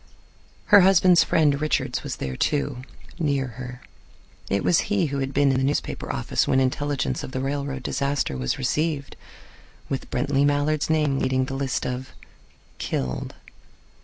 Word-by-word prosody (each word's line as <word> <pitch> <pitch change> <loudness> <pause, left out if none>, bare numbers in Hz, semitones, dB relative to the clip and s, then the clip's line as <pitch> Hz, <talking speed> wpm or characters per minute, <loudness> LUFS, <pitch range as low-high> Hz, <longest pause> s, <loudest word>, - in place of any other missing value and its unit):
Her 205 - +11
husband's 185 -2 +6
friend 145 -3 +2
Richards 155 - 0
was - - -5
there, 65 -1 -4
too, 140 - 0 0.4
near 140 -4 +1
her. 125 +2 -8 0.7
It 100 0 0
was 175 - +4
he 205 -4 +2
who 140 -2 -2
had 135 0 -2
been 140 0 +3
in 130 - +1
the - - 0
newspaper 140 +2 -2
office 60 - -1
when 130 - +3
intelligence 140 +2 -1
of - - -7
the 130 - -2
railroad 135 0 -3
disaster 140 - -1
was 65 0 -2
received, 140 +2 -1 0.7
with 135 - -4
Brently 140 -1 +1
Mallard's 145 +1 +1
name 150 -4 +2
leading 130 0 +1
the 135 - -6
list 135 -1 -2
of 125 +1 -4 0.7
"killed." 65 -1 -3
140 Hz, 155 wpm, -24 LUFS, 130-145 Hz, 0.7 s, Her